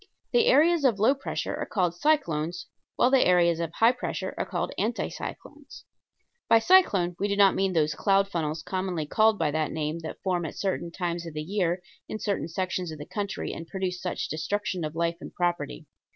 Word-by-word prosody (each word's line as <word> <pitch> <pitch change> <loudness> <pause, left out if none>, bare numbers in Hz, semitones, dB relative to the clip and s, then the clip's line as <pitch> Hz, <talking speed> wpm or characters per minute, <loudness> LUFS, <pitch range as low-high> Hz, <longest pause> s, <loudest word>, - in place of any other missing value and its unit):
The 475 -1 +4
areas 335 -7 +5
of 245 -7 +3
low 220 +6 +4
pressure 275 -1 -4
are - - -3
called 180 -4 0
cyclones, 175 - 0 0.3
while 250 - +3
the 270 -1 +5
areas 170 -2 +3
of 165 -1 -2
high 225 +5 +5
pressure 250 - -4
are - - -3
called - - -2
anti - - -1
cyclones. - - -9 0.7
(By 230 - +7
cyclone 225 - +4
we 205 - +1
do 200 - 0
not 200 -1 +6
mean 195 -1 0
those 155 -3 +2
cloud 195 -1 +2
funnels 160 -3 -3
commonly 185 -4 -2
called 215 +7 +3
by 150 - +1
that 155 0 -1
name 155 +1 -2
that 160 -1 -7
form 180 -2 0
at - - -8
certain 190 -3 -2
times 170 -1 -3
of 160 - -9
the 150 - -3
year 180 0 -1 0.3
in - - -3
certain 200 -5 -2
sections 180 0 -3
of 155 - -7
the 145 - -8
country 200 -2 -4
and 165 - -7
produce 185 -2 -3
such 180 - -3
destruction 185 +3 -2
of 155 0 -4
life 170 0 0
and - - -10
property. 175 - -2
180 Hz, 200 wpm, -27 LUFS, 165-205 Hz, 0.7 s, By